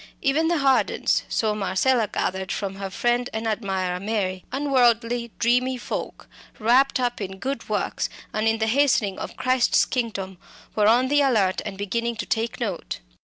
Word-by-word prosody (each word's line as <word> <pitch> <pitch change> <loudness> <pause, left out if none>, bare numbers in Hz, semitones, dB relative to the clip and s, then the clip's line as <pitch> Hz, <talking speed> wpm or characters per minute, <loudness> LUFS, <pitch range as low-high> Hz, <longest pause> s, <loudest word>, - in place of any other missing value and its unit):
Even 295 +4 +2
the 340 0 +2
Hardens 270 -2 +2
so 215 -2 +1
Marcella 210 +4 +1
gathered 190 0 -2
from 195 -1 -3
her 195 -1 -4
friend 240 +5 0
and 220 +1 -3
admirer 190 -5 -1
Mary 195 -3 -2
unworldly 245 -4 +2
dreamy 250 +2 +2
folk, - - -6 0.3
wrapt 260 +5 +3
up 245 -3 -1
in 190 -1 -5
good 270 +7 -4
works, - - -1 0.2
and 215 +1 0
in 225 0 +2
the 220 - 0
hastening 225 -5 +2
of - - -7
Christ's 255 -1 +3
kingdom, 195 -7 -3 0.4
were 210 -1 +3
on 245 +4 +4
the 290 +2 +3
alert 215 -9 +2
and 195 -2 -6
beginning 230 +4 -2
to 210 -2 -4
take 225 +1 -2
note. 205 -8 -4
230 Hz, 165 wpm, -24 LUFS, 200-255 Hz, 0.4 s, on